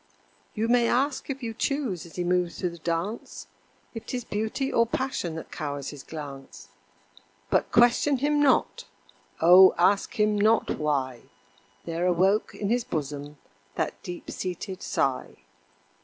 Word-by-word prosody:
You 220 +1 0
may 240 0 +3
ask 275 +5 0
if 275 -1 -5
you 225 -1 -3
choose 235 - -2
as 165 - -15
he 180 - -2
moves 180 -1 0
through 180 - -2
the 170 - -12
dance, 170 +7 -4 0.5
If 225 - -8
'tis 245 -1 -3
Beauty 220 +6 -2
or 230 0 +3
Passion 235 -10 -2
that 160 - -8
cowers 145 -2 -4
his 145 -2 -9
glance, 140 -4 -9 0.8
But - - +1
question 240 +4 +4
him 290 +2 +1
not, 280 -3 +2 0.6
O! 180 +3 +8
ask 200 +6 +2
him 210 0 +3
not 215 +2 +2
why 135 -5 -2 0.6
There 170 +1 -1
awoke 190 +4 +2
in 205 - -3
his 240 +1 +1
bosom 145 - -5 0.4
that - - -3
deep 175 -1 -7
seated 185 +1 -5
sigh. 135 -2 -1
190 Hz, 145 wpm, -26 LUFS, 165-235 Hz, 0.8 s, O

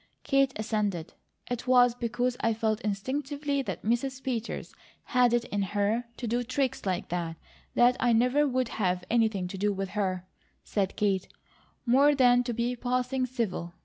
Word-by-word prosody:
Kate 275 -1 +3
assented. 210 -6 -2 0.4
"It 245 +1 -3
was 245 -1 +6
because 245 +1 -1
I 230 -1 +1
felt 220 0 0
instinctively 280 +7 -2
that 190 -9 -5
Mrs. 255 +4 -1
Peters 240 -4 -3 0.3
had 250 -2 +3
it 240 -1 +2
in 205 -3 -2
her 205 +4 0
to 245 - -5
do 235 +2 0
tricks 255 -2 -2
like 185 -2 -2
that, 170 -2 -2 0.4
that 245 +1 +5
I 245 - +3
never 250 +6 +3
would 255 -2 0
have 180 -3 -1
anything 220 -6 +2
to 190 0 -6
do 205 +1 +2
with 195 -1 -3
her," 185 -3 -2 0.4
said 195 -3 -1
Kate, 195 -3 0 0.6
"more 275 +4 +5
than 245 -2 +5
to 240 - -1
be 240 +2 -1
passing 250 +1 -1
civil. 205 -9 -3
235 Hz, 165 wpm, -28 LUFS, 205-255 Hz, 0.6 s, was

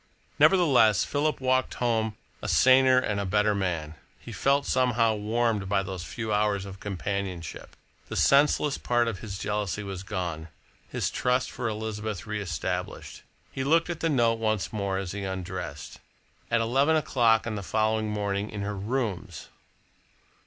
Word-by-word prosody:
Nevertheless, 135 - +5
Philip 150 +1 0
walked 130 0 +1
home 110 -3 0 0.3
a - - -4
saner 130 0 +5
and 105 -5 0
a - - -1
better 105 +2 +2
man. 85 -6 -2 0.3
He - - -10
felt 140 +1 +1
somehow 120 -3 +2
warmed 110 -1 0
by 95 -1 +2
those 95 -2 -5
few 110 +2 -4
hours 105 -2 +1
of 95 -1 -9
companionship. 95 -4 -5 0.3
The - - -5
senseless 145 0 +3
part 120 -1 +1
of 110 -5 -3
his 100 -2 -6
jealousy 105 0 -2
was 95 -2 -6
gone, 85 -4 -4 0.4
his - - -2
trust 125 +1 0
in 125 - -2
Elizabeth 110 -2 -3
reestablished. 100 -8 -4 0.3
He 135 - -3
looked 165 +5 +2
at 165 - -5
the 165 - 0
note 115 -5 +2
once 110 -2 -1
more 100 -2 -1
as 95 -2 -4
he 100 0 -5
undressed. 90 -5 -6 0.5
At 115 -1 +2
eleven 135 +7 +2
o'clock 120 -7 +3
on 115 - -3
the 105 - -4
following 110 +2 0
morning 100 0 -2
in 105 - -5
her 105 +1 -3
rooms! 100 - -3
105 Hz, 155 wpm, -27 LUFS, 100-120 Hz, 0.5 s, Nevertheless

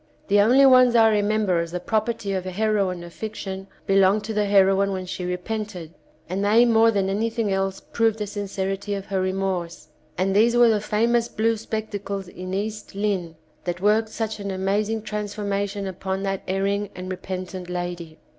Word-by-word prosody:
The 205 +1 +5
only 255 +6 +6
ones 255 -2 +6
I 225 -1 +6
remem 210 +1 +1
ber 180 -3 +2
as 170 0 -3
the 180 - -2
property 220 +1 -1
of 185 -1 -3
a - - -1
heroine 195 -3 0
of 170 -1 -11
fiction 195 -3 -6 0.2
belonged 195 +1 +4
to 220 +1 -4
the 210 -1 +1
heroine 195 0 +4
when 185 -1 -3
she 180 0 -5
repented, 180 -2 -4 0.3
and 190 +3 -2
they 220 +4 +5
more 230 -1 +5
than 200 -3 +1
anything 220 +1 -1
else 195 0 -1
proved 225 -2 0
the 210 - -2
sincerity 200 0 -3
of 195 -1 -5
her 195 -1 -1
remorse, 185 -4 -2 0.3
and 190 +2 +1
these 235 +3 +4
were 240 -1 +7
the 215 -2 +2
famous 230 +3 +1
blue 225 0 +1
spectacles 205 -3 -4
in 185 +1 -8
"East 210 +1 -4
Lynne" 195 -5 -1 0.3
that 175 -1 -2
worked 215 +3 +2
such 220 -1 -4
an 200 -1 -4
amazing 205 +3 -1
transformation 205 -1 -3
upon 190 +1 -4
that 195 -1 -2
erring 200 +2 0
and 185 +1 -6
re 185 - -3
pentant 185 -1 -6
lady. 175 -2 -5
200 Hz, 185 wpm, -24 LUFS, 190-215 Hz, 0.3 s, were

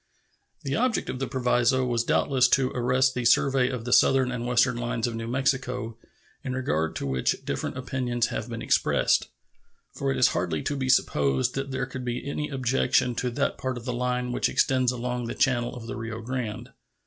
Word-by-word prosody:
The 135 - -2
object 245 -1 0
of 130 - -6
the 135 - -2
proviso 125 0 +2
was 120 -2 0
doubtless 130 +1 +3
to 130 0 +2
arrest 130 +2 +2
the 125 - -2
survey 125 +2 +3
of 120 -3 -5
the 125 - 0
southern 130 -1 +4
and 120 -1 -3
western 125 0 +3
lines 120 -1 -2
of 120 - -2
New 115 0 -5
Mexico, 125 -2 -1 0.5
in 130 - -3
regard 80 -12 -1
to - - -4
which 65 -1 -1
different - - -3
opinions 125 -2 -1
have 115 - -4
been 115 -1 -5
expressed; - - +2 0.7
for - - -2
it 65 - 0
is 65 - +5
hardly 85 -4 -2
to 145 - -2
be 130 -2 -2
supposed 70 - +2
that 135 0 -3
there 130 0 -2
could 130 - -7
be 125 +2 -4
any 150 +1 -3
objection 130 -1 +1
to 125 +2 -2
that 140 +4 -1
part 130 -1 -3
of 120 - -9
the 125 - -2
line 125 0 -1
which 120 - 0
extends 130 -2 +2
along 125 -1 -3
the - - -4
channel 120 -3 +1
of 120 -2 -8
the 125 +3 -5
Rio 115 -1 -5
Grande. 120 -3 -5
125 Hz, 200 wpm, -26 LUFS, 120-130 Hz, 0.7 s, is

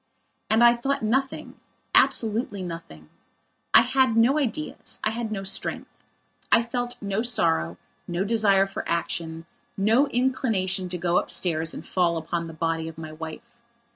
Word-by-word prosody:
And 220 +2 +4
I 240 0 +8
thought 270 +2 -2
nothing; 265 +5 -1 0.4
absolutely 220 -3 +2
nothing. 165 - -8 0.6
I - - +8
had 260 -2 +2
no 255 +6 +4
ideas; 295 +3 -4
I 215 - +1
had 225 -1 -4
no 195 -2 -3
strength. 195 - -5 0.5
I 230 - +5
felt 245 +1 -4
no 200 +1 -1
sorrow, 85 - +1 0.3
no 175 +2 -1
desire 200 -2 +3
for 195 - -6
action, 165 -1 -2 0.3
no 225 +8 +3
inclination 220 -8 0
to 180 - -3
go 175 0 +2
upstairs 165 -2 0
and - - -8
fall 175 -2 +1
upon 170 +1 -3
the 165 - -9
body 165 0 -2
of 160 - -9
my 160 -1 -7
wife. 160 +10 -9
195 Hz, 150 wpm, -25 LUFS, 165-235 Hz, 0.6 s, I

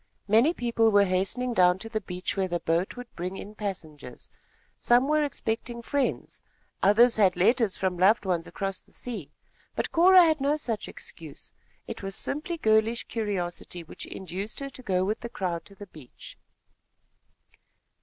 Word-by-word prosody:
Many 225 +9 +5
people 230 -6 +1
were 205 -1 +5
hastening 195 +7 -1
down 180 -3 +4
to 210 - -7
the 220 -1 -3
beach 180 -1 -4
where 190 -1 0
the 175 -1 -2
boat 170 +3 0
would 245 -1 -9
bring 180 +2 -4
in 205 - -8
passengers. 160 - -7 0.5
Some 245 +3 +4
were 305 0 +3
expecting 235 -3 -3
friends. 280 +2 -2 0.4
Others 230 +5 +5
had 195 -4 +4
letters 220 +3 +2
from 185 -2 -1
loved 205 +3 +4
ones 175 -3 -1
across 195 -1 -4
the - - -23
sea; 215 - -6 0.4
but - - -2
Cora 365 +2 +7
had 315 -3 +2
no 285 +2 +2
such 230 -8 -3
excuse. - - -8 0.4
It - - -6
was 195 0 -5
simply 325 +4 -3
girlish 220 -2 +2
curiosity 180 -5 -4
which 160 - -8
induced 190 +3 -5
her 275 -1 -5
to 255 - -7
go 185 -5 0
with 215 +3 -1
the 235 - -6
crowd 175 -6 -3
to 200 - -15
the 205 - -10
beach. 155 -9 -13
210 Hz, 165 wpm, -27 LUFS, 185-240 Hz, 0.5 s, Cora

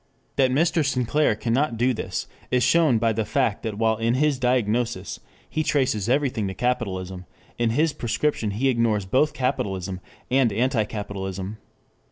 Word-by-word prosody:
That 130 -1 +3
Mr. 160 +4 +2
Sinclair 130 -1 +1
cannot 120 +3 0
do 125 +3 +2
this, - - -4 0.2
is 125 -1 +2
shown 155 -1 +4
by 115 0 +2
the 110 +1 0
fact 105 0 0
that 110 -2 -4
while 110 0 +2
in 115 +2 +1
his 145 -1 +2
diagnosis 120 -4 0 0.3
he 155 - -2
traces 130 -8 0
everything 130 -6 +1
to 95 - -5
capitalism, 95 -7 -2 0.3
in 120 -1 +2
his 150 +6 +2
prescription 120 -1 -1
he 110 +7 0
ignores 115 -5 +1
both 135 +10 +2
capitalism 95 -8 -2 0.3
and 130 -3 +3
anti 115 +1 +1
capitalism. 100 -1 -5
115 Hz, 155 wpm, -24 LUFS, 105-130 Hz, 0.3 s, shown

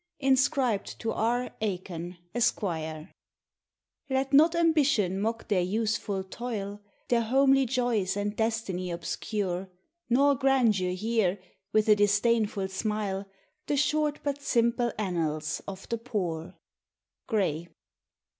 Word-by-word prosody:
INSCRIBED 265 -4 +1
TO 225 - -2
It. 240 +2 0
AIKKN, 180 -4 -4 0.2
ESQ. 240 0 +2
44 160 -3 -4 1.0
Let 265 +1 0
not 320 +4 +6
ambition 290 - +2
mock 225 +2 -2
their 190 -3 +2
useful 205 0 -1
toil, 205 -1 -5 0.3
Their 240 -1 +3
homely 270 +3 +4
joys 225 -6 0
and 205 +1 -2
destiny 220 -5 -1
obscure; 180 +2 -3 0.4
Nor 280 +4 +5
grandeur 240 -9 +2
hear, 205 -1 +1 0.3
with 215 0 +3
a 210 - +7
disdainful 205 -1 +2
smile, 200 0 -2 0.4
The 290 - +1
short 300 +1 +1
but 285 0 -2
simple 235 -2 +1
an 190 -4 -2
rials 155 -1 -1
of 195 -1 -7
the 230 - -1
poor." 185 -7 -3 0.7
GRAY. 170 -7 0
215 Hz, 115 wpm, -28 LUFS, 190-245 Hz, 1.0 s, a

